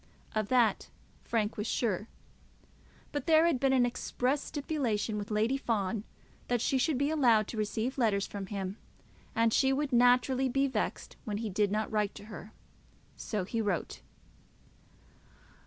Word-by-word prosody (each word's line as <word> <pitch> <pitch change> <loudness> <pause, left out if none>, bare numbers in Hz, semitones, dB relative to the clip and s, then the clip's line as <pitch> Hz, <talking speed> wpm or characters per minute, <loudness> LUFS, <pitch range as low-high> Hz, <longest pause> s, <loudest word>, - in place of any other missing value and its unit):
Of 215 -1 0
that 240 -3 +2 0.3
Frank 220 -1 -1
was 210 +1 -2
sure. 215 -4 -1 1.0
But 290 +3 -4
there 320 0 +6
had 330 -7 +2
been 270 0 +2
an 255 -2 +4
express 250 +3 -1
stipulation 250 -8 -2
with 205 +2 -6
Lady 220 +5 +1
Fawn 215 -4 -1 0.4
that 245 -1 +1
she 265 +4 +1
should 300 0 +1
be 280 +3 +1
allowed 235 -9 +4
to 230 - -6
receive 220 +5 -2
letters 205 -5 +2
from 200 -2 -6
him, 195 0 -4 0.6
and 230 0 +3
she 265 -1 +4
would 280 0 -1
naturally 250 +2 +4
be 275 +2 +2
vexed 270 - -3
when 210 -4 -3
he 220 -1 -3
did 205 +1 +1
not 215 +1 -1
write 210 -2 0
to 205 - -10
her. 210 - -9 0.6
So 210 -4 -3
he 225 +5 -2
wrote. 200 -6 -2
230 Hz, 155 wpm, -31 LUFS, 210-265 Hz, 1.0 s, there